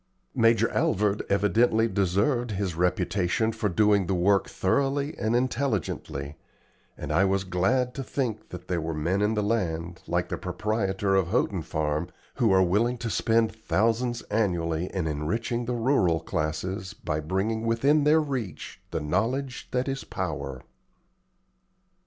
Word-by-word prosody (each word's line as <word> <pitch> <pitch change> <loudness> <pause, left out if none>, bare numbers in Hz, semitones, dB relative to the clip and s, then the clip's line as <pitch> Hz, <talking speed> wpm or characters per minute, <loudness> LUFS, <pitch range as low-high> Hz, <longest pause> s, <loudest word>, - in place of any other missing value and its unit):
Major 115 0 +4
Alvord 105 +1 +1
evidently 110 +3 +3
deserved 100 +6 +1
his 100 -3 -2
reputation 90 +4 +1
for 105 -2 -1
doing 100 0 +3
the 95 - +1
work 95 +3 +2
thoroughly 140 +8 0
and 110 +2 +1
intelligently, 115 - -2 0.6
and - - -5
I 95 - +4
was 95 0 +1
glad 95 +8 +1
to 135 - -4
think 125 -5 -3
that 90 0 -9
there 85 -2 -1
were 80 0 -3
men 85 +6 0
in 105 +2 +2
the 105 - 0
land, 90 -5 -2
like 90 0 -1
the - - -3
proprietor 95 +1 -1
of 95 -3 +3
Houghton 95 -3 0
Farm, 75 -1 -2 0.3
who 115 -4 +3
are 95 0 +5
willing 110 +7 +1
to 115 -1 -4
spend 115 +1 +2
thousands 115 +2 0
annually 85 -6 0
in 95 -4 -2
enriching 110 - -2
the 125 +1 -2
rural 115 - +2
classes 90 +7 -3
by 75 -6 -3
bringing 95 +8 -1
within 140 +6 +3
their 155 +2 +5
reach 130 -10 -5
the - - -3
knowledge 120 - -1
that 125 +1 -1
is 135 0 -3
power. 70 -8 -4
100 Hz, 145 wpm, -27 LUFS, 90-115 Hz, 0.6 s, are